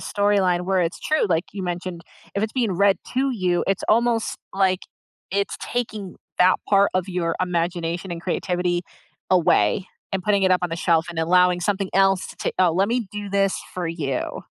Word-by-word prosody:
storyline 200 -4 +1
where 190 0 +1
it's 170 -1 -2
true, 310 -5 +1
like 165 0 +1
you 195 -2 -5
mentioned, 175 0 -4 0.3
if 200 - -1
it's 220 0 -1
being 235 -6 0
read 200 +2 +3 0.2
to 270 +2 +1
you, 180 -6 0
it's 195 0 0
almost, 230 0 +2 0.2
like, 190 -1 +2 0.5
it's 200 0 -1
taking 215 -6 -4 0.2
that 180 +1 +6
part 200 0 +4
of 185 +1 0
your 175 -3 -1
imagination 175 0 -2
and 170 - -5
creativity 180 -1 -1 0.5
away 170 - +3 0.3
and 190 - -1
putting 200 0 +2
it 190 - +3
up 180 - +3
on 175 - -1
the 165 - -2
shelf 165 -1 +2
and 170 - -6
allowing 180 +2 +3
something 195 +1 -1
else 195 -1 +3
to, - - -2
"Oh, 185 -2 +5
let 190 +4 +2
me 235 -3 -1
do 205 -1 -5
this 195 -1 +1
for 180 -2 -2
you." 145 -6 -3
185 Hz, 185 wpm, -23 LUFS, 175-200 Hz, 0.5 s, that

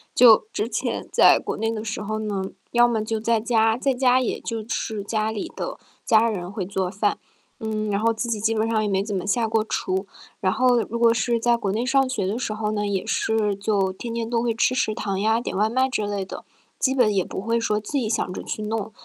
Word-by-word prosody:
就 225 -3 +7
之 215 - -2
前 - - -3
在 - - +7
国 - - -4
内 225 +1 -1
的 215 -1 -4
时 220 -1 -4
候 215 +1 -3
呢， 210 -3 -2 0.3
要 240 0 +5
么 225 -3 0
就 220 0 -2
在 230 0 +1
家， 225 -1 +2
在 270 +1 +1
家 250 0 +3
也 245 - -2
就 225 -2 -4
吃 220 -2 -3
家 215 +1 -1
里 210 - -5
的， - - -4 0.3
家 225 +1 +4
人 180 -2 -5
会 200 -4 -4
做 190 -1 -2
饭， 205 +2 -1 0.4
嗯， 215 -2 -2
然 200 +1 0
后 230 - +3
自 225 +2 -3
己 225 -2 -1
基 225 +2 +1
本 220 +1 +1
上 220 -1 +1
也 210 - -1
没 195 0 +1
怎 205 -1 -4
么 180 - -2
下 230 +2 +1
过 220 -1 +1
厨。 190 -2 -2 0.3
然 185 -1 +1
后 250 +1 +3
如 235 - -4
果 230 -1 +5
是 235 +1 +1
在 240 +1 +3
国 205 -5 -2
内 230 +4 -1
上 270 0 +2
学 215 -7 -1
的 205 +5 -2
时 215 -4 -3
候 215 -1 -2
呢， 205 -1 -1
也 195 -1 -1
是 220 -2 0
就 200 -2 0
天 235 +5 -6
天 230 -1 -2
都 230 0 0
会 235 -1 0
吃 245 +2 +2
食 220 -4 0
堂 195 -4 -2
呀， 220 +2 +2
点 240 - -5
外 210 +3 +2
卖 260 +3 +2
之 215 -5 -2
类 200 -2 -2
的， - - -8 0.4
基 265 0 +2
本 225 -5 +3
也 190 -2 +2
不 - - -6
会 230 +4 0
说， 215 -2 0
自 270 +7 -2
己 220 -4 -2
想 220 -5 -1
着 - - -5
去 215 - -5
弄。 220 0 -3
220 Hz, 270 characters per minute, -23 LUFS, 205-230 Hz, 0.4 s, 就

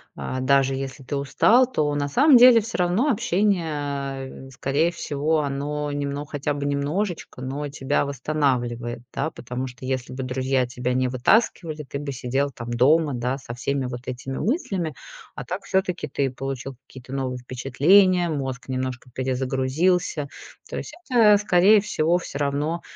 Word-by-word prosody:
а, 130 - -4
даже 135 0 +3
если 135 +1 -6
ты 140 +2 -3
устал, 225 - +4
то 150 -10 0
на 145 0 0
самом 265 - +6
деле 240 -1 +8
всё 225 +2 -5
равно 180 +10 +2
общение, 150 - -1
э, - - -13
скорее 140 +6 0
всего, 155 -1 -1
оно 145 +1 -3
немно 145 0 -3
хотя 145 0 -2
бы 145 0 -4
немножечко, 145 +3 -2
но 140 +3 -4
тебя 145 0 -1
восстанавливает, 125 -4 -1
да? 145 +3 -1
Потому 125 +2 -5
что 125 0 -10
если 130 -1 -3
бы 130 +1 -4
друзья 130 0 0
тебя 125 +1 -3
не 130 0 +1
вытаскивали, 155 - +1
ты 140 0 -6
бы 145 -1 -4
сидел 135 +2 -1
там 115 -1 -7
дома, 145 +5 +3
да, 125 +2 -2
со 130 -3 -8
всеми 135 +2 -2
вот 120 -1 -6
этими 130 +1 -5
мыслями. 200 - -1 0.4
А - - -5
так 185 +3 -5
всё-таки 190 -2 -1
ты 135 -2 -1
получил 135 0 -5
какие-то 130 -1 -12
новые 130 -2 -2
впечатления, 170 +9 +3
мозг 135 -4 -4
немножко 130 -1 -3
перезагрузился. 135 +6 0 0.4
То - - -5
есть - - -6 0.2
это, 220 -5 +6
скорее 200 +1 +5
всего, 170 -4 +1
всё 170 - -6
равно, 145 +4 -1
140 Hz, 160 wpm, -24 LUFS, 130-170 Hz, 0.4 s, деле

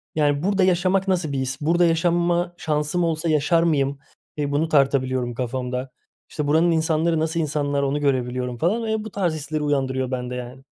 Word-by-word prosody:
Yani, 145 0 +1
burada 200 0 +2
yaşamak 185 +1 +2
nasıl 175 -6 0
bir 135 - -2
his? 130 +3 -3
Burada 170 +3 +3
yaşama 175 +1 +1
şansım 150 +2 -1
olsa 165 0 0
yaşar 155 +2 +3
mıyım? 140 -4 +1 0.4
Eee, 145 -1 -1
bunu 150 +3 +1
tartabiliyorum 130 -4 +1
kafamda. 125 +1 -3 0.4
İşte, 150 -2 -3
buranın 160 +3 +3
insanları, 160 0 +1
nasıl 160 +1 -1
insanlar 145 -2 -1
onu 140 +2 0
görebiliyorum 125 -3 -1
falan 205 - 0
ve 220 -1 -1
bu 220 - -8
tarz 180 -5 0
hisleri 155 0 -3
uyandırıyor 130 -3 -1
bende, 125 -1 -3
yani. 125 +2 -8
150 Hz, 175 wpm, -23 LUFS, 135-170 Hz, 0.4 s, Burada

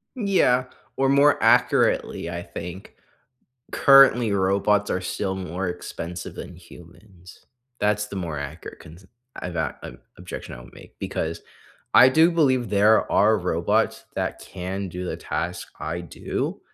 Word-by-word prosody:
Yeah, 185 - +2 0.3
or 135 0 +2
more 140 +1 +4
accurately, 85 - +2
I 85 0 -5
think, 85 +2 -9 0.8
currently, 135 -5 +6
robots 100 +2 +1
are 90 - -1
still 95 +1 -3
more 95 0 -4
expensive 90 0 -7
than 90 - -8
humans. 90 +1 -16 0.4
That's 105 0 +1
the 100 - -8
more 85 -5 -4
accurate 70 +4 -8
cons 85 +5 -14 0.4
I’ve 90 - -5
got 80 -4 -3
an - - -9 0.2
objection - - -8
I - - -11
would - - -16
make - - -16
because 80 +1 -4 0.5
I 130 - +9
do 160 +6 +4
believe 130 -8 +2
there 105 +2 +3
are 110 +2 +4
robots 85 -1 0
that - - -3
can 95 +1 -6
do 90 +1 -6
the - - -4
task - - -4
I 85 - -4
do, 75 -6 -4
95 Hz, 145 wpm, -23 LUFS, 85-110 Hz, 0.8 s, I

